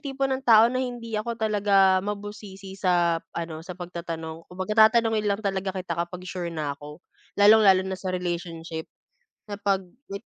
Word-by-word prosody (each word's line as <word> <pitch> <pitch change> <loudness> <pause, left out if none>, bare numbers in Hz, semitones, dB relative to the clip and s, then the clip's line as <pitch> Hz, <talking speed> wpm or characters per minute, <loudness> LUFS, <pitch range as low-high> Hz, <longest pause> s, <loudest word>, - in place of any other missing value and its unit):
tipo 275 0 -2
ng 265 0 -1
tao 225 -4 +6
na 255 - 0
hindi 240 -3 -5
ako 225 +2 -2
talaga 200 -3 +3
mabusisi 205 -1 -7
sa 175 -3 +1 0.2
ano 165 -2 -4
sa 180 +1 -9
pagtatanong. 165 -2 -7
Kumbaga 210 +4 +4
tatanungin 225 -2 +1
lang 200 +2 -2
talaga 190 -1 -2
kita 180 -2 -4
kapag 175 +2 -4
sure 180 -2 -4
na 155 -4 -3
ako, 150 +4 -12 0.3
lalong-lalo 205 -2 +6
na 190 0 -5
sa 190 - -4
relationship 170 -3 -4 0.6
na 205 - -5
'pag 200 -1 0 0.3
wit 200 - -6
190 Hz, 160 wpm, -25 LUFS, 175-210 Hz, 0.6 s, tao